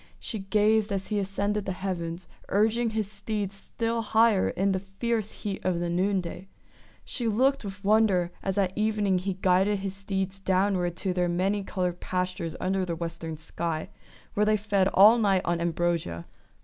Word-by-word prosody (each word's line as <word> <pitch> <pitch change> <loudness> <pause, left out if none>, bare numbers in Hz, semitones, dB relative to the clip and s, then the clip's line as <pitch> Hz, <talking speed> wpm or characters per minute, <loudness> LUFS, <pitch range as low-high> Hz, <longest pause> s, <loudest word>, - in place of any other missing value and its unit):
She 220 - -4
gazed 210 +2 +2
as 195 -1 -3
he 210 -2 0
ascended 200 +1 -1
the 190 - -1
heavens, 175 -2 -4 0.2
urging 225 +3 +2
his 220 -2 -2
steeds 205 -1 -3
still 230 +3 -2
higher 220 -2 +3
in 195 +1 +1
the 190 - 0
fierce 210 +3 -2
heat 200 -3 -5
of 180 -2 0
the 175 0 -1
noonday. 185 0 -1 0.6
She 240 -3 -2
looked 260 +5 +2
with 200 0 -7
wonder 200 -4 +3
as 195 0 -2
at 190 -2 +1
evening 210 -3 +1
he 190 +1 -3
guided 190 +2 +3
his 195 -1 -4
steeds 195 -1 -3
downward 185 -2 +1
to 185 0 -1
their 180 -1 +1
many 195 +4 0
coloured 180 -2 -2
pastures 180 -3 -3
under 190 +1 0
the 170 -2 -2
western 165 -1 -5
sky, 160 0 -4 0.4
where 210 +1 +2
they 215 0 +4
fed 200 -2 +1
all 210 +5 +7
night 195 -4 +3
on 170 0 0
ambrosia. 170 - -1
195 Hz, 170 wpm, -27 LUFS, 180-210 Hz, 0.6 s, all